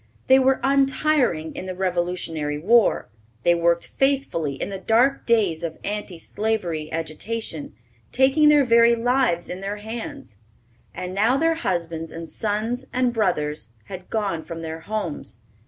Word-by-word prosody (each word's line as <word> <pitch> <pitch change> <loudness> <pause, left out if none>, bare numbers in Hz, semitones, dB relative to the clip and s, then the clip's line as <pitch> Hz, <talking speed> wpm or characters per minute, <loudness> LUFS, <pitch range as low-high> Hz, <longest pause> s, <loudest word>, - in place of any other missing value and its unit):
They 265 0 +6
were 265 0 +3
untiring 270 - +2
in 185 - -6
the 185 - -4
Revolutionary 175 -5 -2
War; 220 +8 +3 0.4
they 175 - +5
worked 170 0 +2
faithfully 270 - 0
in - - -4
the 195 -1 -5
dark 240 +8 +2
days 205 -9 +2
of 165 -2 -4
anti 205 -4 -4
slavery 175 -5 -2
agitation, 165 - -5 0.4
taking 270 +4 +4
their 295 -2 +5
very 235 0 +5
lives 240 -7 +1
in 180 +1 -6
their 200 +1 -3
hands. 220 - -7 0.5
And 180 0 -6
now 225 +7 +3
their 330 +2 +3
husbands 170 - -3
and 165 0 -7
sons 225 +5 -2
and 250 -2 +1
brothers 150 - -1
had 185 - -9
gone 200 -7 -1
from 165 -1 -7
their 160 0 -5
homes. 200 -3 -5
200 Hz, 145 wpm, -23 LUFS, 165-240 Hz, 0.5 s, They